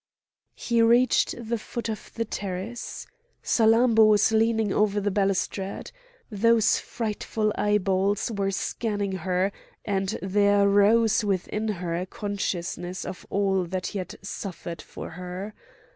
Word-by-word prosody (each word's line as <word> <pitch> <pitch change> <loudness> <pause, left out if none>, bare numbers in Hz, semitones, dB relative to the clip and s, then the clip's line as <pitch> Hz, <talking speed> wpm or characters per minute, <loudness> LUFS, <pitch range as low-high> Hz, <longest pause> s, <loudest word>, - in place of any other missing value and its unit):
He 235 -1 +1
reached 235 +2 +4
the 235 -1 -3
foot 235 +2 -5
of 215 -2 -6
the 230 - -1
terrace. 200 +3 -5 0.4
Salammbô 225 0 +5
was 210 +1 +4
leaning 220 -2 +2
over 210 -1 +2
the 205 0 -1
balustrade; 195 0 -1 0.4
those 225 +1 +3
frightful 215 -1 -2
eyeballs 200 0 +1
were 200 -2 -1
scanning 205 +1 -2
her, 185 +1 0 0.3
and 195 -1 -1
there 200 +1 +3
rose 215 +2 +4
within 205 +2 -1
her 180 -5 -2
a 180 +2 -3
consciousness 185 -3 -4
of 185 - -8
all 195 -2 +1
that 185 +1 -4
he 200 - -2
had 185 - -6
suffered 175 -4 -6
for - - -9
her. 180 +4 -6
205 Hz, 130 wpm, -26 LUFS, 190-220 Hz, 0.4 s, Salammbô